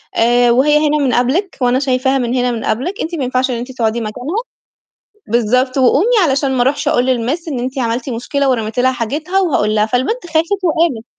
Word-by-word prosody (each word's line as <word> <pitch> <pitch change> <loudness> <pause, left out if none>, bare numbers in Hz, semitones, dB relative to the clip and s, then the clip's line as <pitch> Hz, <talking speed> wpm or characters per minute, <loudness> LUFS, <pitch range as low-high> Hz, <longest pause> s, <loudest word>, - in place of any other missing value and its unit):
آآ 240 +1 +3
"وهي 295 +5 +3
هنا 300 +1 +1
من 270 -4 0
قبلِك 295 +11 0
وأنا 250 +1 +2
شايفاها 265 0 +1
من 245 -1 -1
هنا 250 -1 +1
من 230 -2 -4
قبلِك، 310 - -2
أنت 335 +1 -3
ما 280 - -3
ينفعش 255 +1 0
إن - - -2
أنتِ 250 +2 -6
تقعدي 235 -2 -1
مكانها،" 250 - -5 0.9
بالضبط، 250 +4 +1
"وقومي 315 - +3
علشان 275 -2 +1
ما 250 -2 +1
أروحش 290 +3 0
أقول 255 -5 +1
للMiss 260 +7 -1
إن 270 -5 -3
أنتِ 260 +2 -4
عملتِ 240 +2 -2
مشكلة 275 +4 -1
ورميتِ 225 -1 -2
لها 260 +1 +3
حاجتها 300 - -2
وهاقول 215 - +1
لها." 210 0 +2
فالبنت 265 - -1
خافت 340 +4 -1
وقامت. 320 -9 +1
255 Hz, 200 wpm, -16 LUFS, 240-300 Hz, 0.9 s, آآ